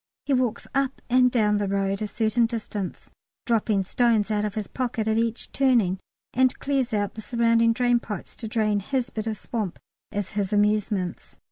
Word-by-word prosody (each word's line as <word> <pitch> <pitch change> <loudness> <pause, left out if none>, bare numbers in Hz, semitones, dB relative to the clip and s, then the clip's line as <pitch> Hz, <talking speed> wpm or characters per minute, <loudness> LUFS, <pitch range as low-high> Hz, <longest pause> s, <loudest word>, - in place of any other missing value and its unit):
(He 280 - +1
walks 250 -3 0
up 275 0 0
and 250 0 +6
down 210 -4 +2
the 205 - 0
road 195 0 0
a 215 - -1
certain 225 +2 +2
distance, 215 -4 -5 0.3
dropping 215 -4 +2
stones 225 0 +2
out 210 -1 +1
of 210 - -4
his 215 -2 -2
pocket 240 -3 -2
at 220 0 +2
each 230 0 -2
turning, 235 -9 +2 0.3
and 255 0 +3
clears 270 -3 0
out 205 -2 0
the 220 - -7
surrounding 230 0 +3
drain 245 0 +2
pipes 210 -5 -7
to 225 - -5
drain 215 -2 +1
his 245 +4 -2
bit 220 0 -4
of 220 -1 -2
swamp, 210 -5 -4 0.3
as 205 -2 -3
his 200 -2 -1
amusements.) 210 -3 0
220 Hz, 180 wpm, -25 LUFS, 205-240 Hz, 0.3 s, and